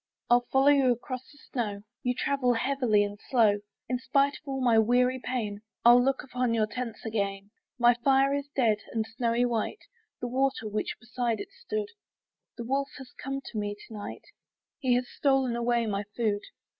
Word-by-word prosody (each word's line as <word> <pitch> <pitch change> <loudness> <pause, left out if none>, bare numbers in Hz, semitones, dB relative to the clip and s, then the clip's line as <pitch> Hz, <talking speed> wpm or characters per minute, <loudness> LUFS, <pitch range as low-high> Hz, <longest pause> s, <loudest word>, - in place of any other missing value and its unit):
I'll 245 0 +5
follow 270 +1 +5
you 275 -3 +5
across 255 +1 -4
the 290 - -19
snow, 210 -8 -4 0.2
You 245 0 0
travel 265 -2 +1
heavily 245 -4 +2
and 205 0 -5
slow: 220 -5 +4 0.3
In 250 0 -1
spite 275 +2 +2
of - - -13
all 270 -1 -2
my 240 -3 +4
weary 250 +3 +3
pain, 215 -5 -3 0.2
I'll 240 +1 +8
look 270 +1 +1
upon 250 -2 -1
your 220 -1 +3
tents 230 +1 -6
again. 200 -2 -2 0.3
My 240 0 +6
fire 270 +3 +3
is 285 0 -2
dead, 225 -5 +3
and 220 -1 0
snowy 235 +1 0
white 240 - -2 0.4
The 245 - -3
water 260 -2 0
which 210 0 -2
beside 240 -1 -2
it - - -6
stood; 430 -1 -4 0.7
The 235 - -4
wolf 275 +3 0
has 265 -2 -11
come 275 +1 -3
to 215 - -3
me 205 0 -2
to 210 +2 -14
night, 205 -1 -7 0.6
And 260 - -1
he 245 - +6
has 250 0 0
stolen 270 -4 +1
away 235 0 +1
my 200 -1 -1
food. 210 -4 +1
245 Hz, 185 wpm, -28 LUFS, 220-265 Hz, 0.7 s, I'll